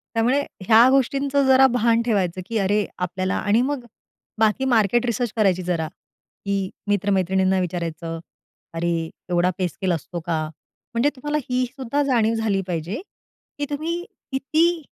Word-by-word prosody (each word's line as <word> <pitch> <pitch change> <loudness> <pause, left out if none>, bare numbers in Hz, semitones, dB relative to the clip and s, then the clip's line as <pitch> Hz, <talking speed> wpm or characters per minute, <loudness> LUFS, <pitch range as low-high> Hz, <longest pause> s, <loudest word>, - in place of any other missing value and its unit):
त्यामुळे 245 +5 +3 0.3
ह्या 230 +3 +8
गोष्टींचं 275 +1 +2
जरा 265 0 +7
भान 235 -1 +3
ठेवायचं 190 -6 0
की 225 0 -1
अरे, 205 +1 +1
आपल्याला 185 +1 -2
आणि 220 +4 +2
मग 270 -2 -2 0.5
बाकी 220 +4 +2
मार्केट 240 -1 +3
रिसर्च 235 -1 -1
करायची 190 -4 +2
जरा, 170 -3 -1
की 195 +4 -6 0.2
मित्रमैत्रिणींना 190 -1 +2
विचारायचं, 165 -2 -3 0.6
"अरे 170 +1 0 0.4
एवढा 175 +1 +3
पे 180 -1 +1
स्केल 185 +2 -2
असतो 170 +2 -4
का?" 160 -2 0 0.5
म्हणजे 235 +5 +3
तुम्हाला 295 +3 -2
ही 250 0 +2
सुद्धा 270 +2 -1
जाणीव 230 -5 +2
झाली 215 -3 0
पाहिजे, 175 - -3 0.6
की 290 - -1
तुम्ही 330 +4 -2 0.3
किती 320 +5 +1
215 Hz, 140 wpm, -23 LUFS, 185-260 Hz, 0.6 s, ह्या